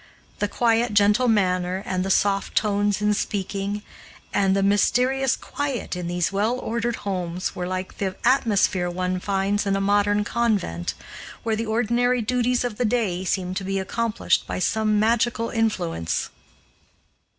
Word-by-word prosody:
The 205 - +1
quiet, 230 0 +1
gentle 210 +4 +4
manner 185 -3 +1
and 185 -1 -1
the 190 - -3
soft 195 0 +1
tones 205 -1 +1
in 210 0 +3
speaking, 200 0 -3 0.5
and 195 -1 +3
the 195 - +2
mysterious 250 +6 +2
quiet 280 -9 -4
in 180 -1 -4
these 175 0 0
well 215 +5 0
ordered 235 -1 -2
homes 180 -2 -3
were 180 0 -3
like 185 0 -5
the 190 -2 -2
atmosphere 205 -8 +2
one 180 +1 -2
finds 200 +1 0
in 195 - +2
a - - 0
modern 205 +1 +2
convent, 205 - -1 0.5
where 225 -1 0
the 225 +1 -3
ordinary 240 +2 +1
duties 250 +2 +1
of 240 -4 -3
the 250 - +1
day 210 -6 0
seem 185 -1 -1
to 190 +1 -3
be 195 +1 -2
accomplished 225 +3 0
by - - -3
some 215 +2 +1
magical 230 +1 +1
influence. 85 - -1
205 Hz, 150 wpm, -24 LUFS, 190-230 Hz, 0.5 s, gentle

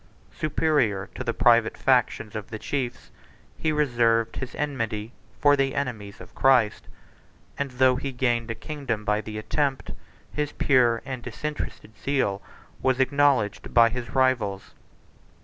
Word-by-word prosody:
Superior 145 -10 0
to 130 - -5
the 120 - 0
private 115 0 +3
factions 120 -4 +1
of 105 -1 -5
the 110 - -5
chiefs, 120 +3 -4 0.4
he 160 - -1
reserved 120 -6 +1
his 130 -1 -6
enmity 115 -7 -3 0.3
for 145 0 +5
the 135 -1 0
enemies 110 -8 -4
of - - -13
Christ; 125 -6 +3 0.7
and 140 0 -2
though 130 0 +3
he 135 +1 -4
gained 120 -2 0
a 115 - -2
kingdom 135 -9 -4
by 105 +1 +1
the 110 -1 -7
attempt, 135 +5 -1 0.4
his 150 -1 -2
pure 120 -4 +3
and 130 -2 -5
disinterested 125 -2 -6
zeal 130 -8 -1 0.4
was 130 -1 +1
acknowledged 130 -7 +1
by 115 -1 +7
his 120 0 -5
rivals. 120 -7 +1
125 Hz, 140 wpm, -25 LUFS, 110-135 Hz, 0.7 s, by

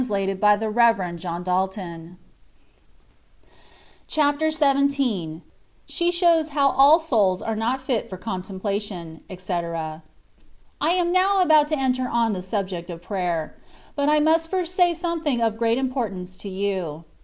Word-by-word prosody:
THE - - -4
VAY 195 0 0
OF 190 - -7 0.2
PERFECTION. 215 -6 +2
79 180 0 -3 1.9
CHAPTER 300 0 +1
XVII. 275 - +1 0.4
SHE 345 0 -1
SHOWS 340 -3 +3
HOW 280 -2 +2
ALL 280 +5 +6
SOULS 215 - +1
ABB 225 -1 -2
NOT 245 +4 -1
FIT 255 -4 -2
FOB 185 - -8
CONTEMPLATION, 190 -3 -5
ETC. 170 -4 -4 0.8
I 310 - +2
AM 350 0 +1
now 375 +1 +3
about 310 -3 +5
to 310 0 -1
enter 255 -1 0
on 230 -2 +1
the 185 - -4
subject 185 -2 -4
of 170 -1 -8
prayer; 175 -5 -3 0.4
but 285 0 +1
I 300 0 +4
must 325 +2 +2
first 365 -1 -2
say 355 -2 +3
something 330 -6 -1
of 225 -1 0
great 230 0 +2
importance 220 -9 -3
to 200 - -7
you. 185 -5 -3
225 Hz, 140 wpm, -23 LUFS, 185-300 Hz, 1.9 s, ALL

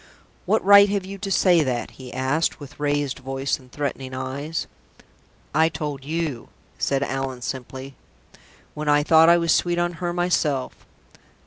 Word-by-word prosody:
"What 215 0 +2
right 200 0 +8
have 200 -2 -1
you 195 +1 -8
to 200 0 -4
say 180 -3 +4
that?" 125 -3 -2
he 130 -2 -11
asked, 130 +6 0
with 145 0 -12
raised 145 -2 -1
voice 135 +2 -2
and 130 -1 -19
threatening 135 -2 -4
eyes. 140 +5 -4 0.9
"I 160 +1 +4
told 150 -3 -5
you," 155 -4 -3 0.3
said 140 0 0
Allan, 135 -2 -3
simply, 130 +1 -6 0.8
"when 150 0 -3
I 145 0 +4
thought 160 +1 +6
I 170 - +7
was 170 -1 +1
sweet 175 0 +1
on 175 0 0
her 175 -1 -1
myself. 170 -6 0
145 Hz, 155 wpm, -23 LUFS, 135-170 Hz, 0.9 s, right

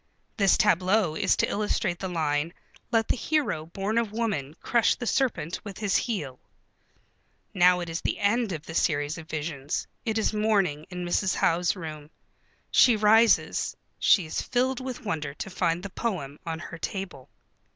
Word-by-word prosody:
This 200 -3 +4
tableau 185 -2 +3
is - - +2
to - - +2
illustrate 205 -3 -1
the 190 - -3
line: 160 -1 -1 0.4
"Let 225 -1 +2
the - - +1
hero 265 - -1
born 195 +6 -1
of 230 -3 -2
woman 205 -11 -2
crush 235 -2 +2
the 245 - -6
serpent 225 - -1
with 200 -3 -8
his 205 -3 0
heel." 150 - -1 1.1
Now 180 0 +5
it 175 - -4
is 165 0 -4
the - - -1
end 215 +1 +1
of 160 -2 -5
the 160 - -8
series 150 -1 0
of 160 0 -12
visions. 150 -3 -3 0.2
It 220 -1 -1
is 220 - +1
morning 200 -8 +1
in 180 -1 -5
Mrs. 185 +2 +1
Howe's 175 +2 +2
room. 155 -4 -8 0.6
She 245 - +6
rises. 220 +2 +3 0.2
She 185 - +4
is 155 - -3
filled 255 +1 0
with 255 -3 -6
wonder 150 -6 -3
to - - -6
find 175 -1 0
the 200 - -6
poem 160 -13 -3
on 165 -1 -2
her 165 0 -8
table. 180 -8 -5
185 Hz, 170 wpm, -27 LUFS, 160-220 Hz, 1.1 s, She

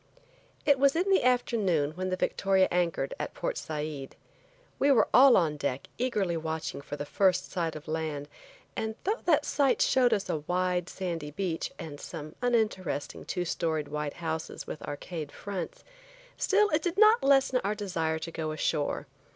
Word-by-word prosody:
IT 285 -3 +4
was 275 +1 +4
in 355 +4 +1
the 385 - +4
afternoon 210 - +2
when 185 +3 -3
the 185 - 0
Victoria 190 0 +2
anchored 170 -6 0
at - - -4
Port - - -2
Said. 150 -3 -5 0.6
We 280 - +4
were 265 - +5
all 265 -1 +8
on 155 -4 +1
deck 140 -2 -2
eagerly 210 -8 0
watching 160 -2 -3
for 145 - -6
the 145 - -5
first 185 +3 +1
sight 165 -3 -2
of 155 - -9
land, 155 -2 -3 0.5
and 220 0 -2
though 425 +5 0
that 310 -3 +3
sight 275 -3 +2
showed 250 -2 +4
us 205 -3 +1
a - - 0
wide, 180 +3 -1
sandy 170 -5 -4
beach, 170 +1 -3
and 155 -5 -7
some 155 -2 -7
uninteresting 215 - -1
two 180 - -2
storied 160 -3 -1
white 150 -1 -3
houses 160 -1 -4
with - - -7
arcade 150 0 -6
fronts, 190 -5 -6 0.5
still 415 +1 +3
it 305 - +2
did 350 +1 -2
not 435 +2 +6
lessen 270 -2 +4
our 205 +2 0
desire 170 -6 -1
to 165 +1 -6
go 160 -1 -3
ashore. 155 -2 -1
180 Hz, 170 wpm, -29 LUFS, 155-240 Hz, 0.6 s, all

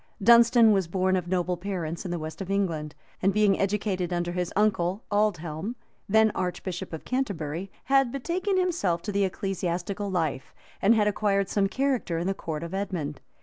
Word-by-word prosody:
Dunstan 235 +1 +6
was 195 -4 +2
born 185 +2 +1
of 180 -2 -2
noble 180 0 0
parents 175 -3 -4
in - - -3
the 175 - -2
west 155 +3 -6
of 190 - -5
England; 165 -7 -1 0.3
and 195 - +3
being 205 -1 +3
educated 195 -3 -1
under 175 0 -1
his 180 0 -2
uncle 195 -2 +1
Aldhelm, 200 -1 0 0.3
then 220 +1 +5
archbishop 180 0 -4
of 160 - -7
Canterbury, 195 - -2
had 270 -2 +3
betaken 360 +9 -1
himself 315 - 0
to 205 - -3
the 200 0 +2
ecclesiastical 195 +1 -3
life, 160 -8 -2 0.3
and 215 +4 +5
had 210 -1 +3
acquired 200 -2 +1
some 200 -1 +2
character 260 -9 0
in 170 - -2
the 195 - +1
court 160 -4 -5
of 170 +2 -6
Edmund. 180 -8 -3
195 Hz, 175 wpm, -27 LUFS, 175-210 Hz, 0.3 s, Dunstan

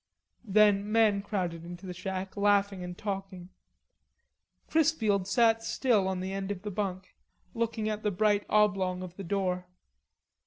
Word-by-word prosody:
Then 205 0 +4
men 215 -3 +4
crowded 180 -5 -3
into 175 +2 -9
the 180 - -5
shack, 185 +1 -5
laughing 200 -2 +2
and 180 0 -7
talking. 195 -3 -5 1.2
Chrisfield 225 - +2
sat 225 +1 +3
still 225 -4 +1
on 190 -1 -2
the 190 +1 -4
end 195 0 -3
of 200 -2 -4
the 210 - -4
bunk, 190 -2 -4 0.4
looking 230 -1 -1
at 215 0 -2
the 210 - +1
bright 205 +1 +2
oblong 195 -3 +2
of 180 -1 -9
the 195 - -7
door. 180 -1 -1
200 Hz, 150 wpm, -29 LUFS, 185-210 Hz, 1.2 s, Then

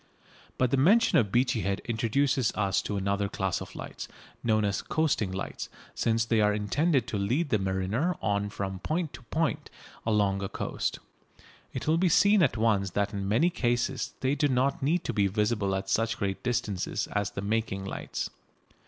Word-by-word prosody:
But 125 -1 +2
the 140 - +3
mention 185 - +5
of 105 -5 0
Beachy 120 -1 +2
Head 100 0 -1
introduces 120 +3 +1
us 100 -3 +1
to 105 - -3
another 100 +1 0
class 95 -2 -1
of - - -9
lights, - - -7 0.4
known 110 -2 +2
as 100 -1 0
"coasting" 145 -11 0
lights, 95 +1 -5 0.2
since 115 0 +1
they 115 -1 +2
are 105 0 +4
intended 135 - +1
to 105 - -2
lead 130 +11 0
the 110 - +2
mariner 95 - 0
on 100 -1 0
from 95 -2 -4
point 155 - -2
to 120 - -9
point 160 +5 -1 0.3
along 100 -3 +1
a 95 - -3
coast. - - -3 0.7
It - - -5
will 160 +2 +3
be 180 0 +3
seen 200 +4 +5
at 135 -7 +2
once 105 -3 +2
that 100 +1 +1
in 100 -1 -3
many 155 +12 +3
cases 120 -3 -1
they 130 +1 +2
do 145 +1 +2
not 135 +5 +1
need 160 +6 +1
to - - -2
be 100 -2 +3
visible 105 -1 0
at 95 0 -3
such 115 +2 +1
great 95 -1 -2
distances 110 -6 -1
as 105 0 0
the - - -5
making 100 -2 -1
lights. - - -4
110 Hz, 185 wpm, -28 LUFS, 100-135 Hz, 0.7 s, mention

